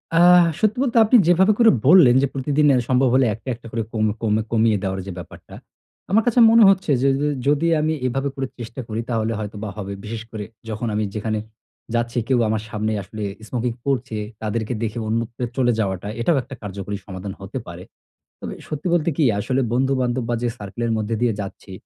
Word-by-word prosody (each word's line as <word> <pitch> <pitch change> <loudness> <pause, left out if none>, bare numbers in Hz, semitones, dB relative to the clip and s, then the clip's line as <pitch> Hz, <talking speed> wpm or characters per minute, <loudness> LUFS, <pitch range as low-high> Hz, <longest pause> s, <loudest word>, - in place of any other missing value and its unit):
আ - - +4 0.4
সত্যি 215 +1 +1
বলতে 245 -3 0
আপনি 245 +4 +6
যেভাবে 185 +4 +5
করে 230 -1 +7 0.2
বললেন 145 -7 +7
যে, 140 - +2
প্রতিদিন 145 +2 +1
অ্যা 130 - +4
সম্ভব 130 0 +3
হলে 130 0 +4
একটা, 115 +4 -12
একটা 115 0 -13
করে 115 0 -2
কম 110 -1 +1 0.2
কম 110 -2 +1 0.2
কমিয়ে 110 -2 +3
দেওয়ার 95 -1 -2
যে - - -4
ব্যাপারটা। 90 - -11 0.6
আমার 220 +3 +4
কাছে 240 +1 +3
মনে 230 0 +7
হচ্ছে 190 -5 +2
যে 135 - +3
যে 150 - +1 0.2
যদি 145 +3 +2
আমি 155 +1 +1
এভাবে 135 +3 -1
করে 135 -1 -3
চেষ্টা 120 +2 -6
করি 110 +1 -3
তাহলে 115 -1 0
হয়তোবা 105 0 -5
হবে। 100 -1 -5
বিশেষ 110 +1 -5
করে 110 -2 -5 0.3
যখন 110 +2 -3
আমি 110 - 0
যেখানে 110 0 -2 0.6
যাচ্ছি 120 +1 -1
কেউ 130 -2 +2
আমার 110 0 -1
সামনে 110 0 -2
আসলে 110 +3 -7 0.3
স্মোকিং 120 -1 -2
করছে, 130 -4 -1 0.2
তাদেরকে 110 +1 -2
দেখে 110 +1 -3
অন্যত্রে 115 +2 -2
চলে 125 -2 +3
যাওয়াটা। 95 -2 -2
এটাও 155 +5 +2
একটা 135 +2 -9
কার্যকরী 100 0 -5
সমাধান 95 0 -7
হতে - - -6
পারে। - - -9 0.6
তবে - - -6
এ - - -13
সত্যি 150 +3 -5
বলতে 170 -1 +1
কী? 155 - +2
আসলে 130 +6 0
বন্ধু-বান্ধব 130 -1 0
বা, 120 - 0
যে 120 - +1
সার্কেলের 115 +3 -3
মধ্যে 110 +1 -2
দিয়ে 120 -2 +3
যাচ্ছি, 95 -1 -8
120 Hz, 200 wpm, -21 LUFS, 110-135 Hz, 0.6 s, করে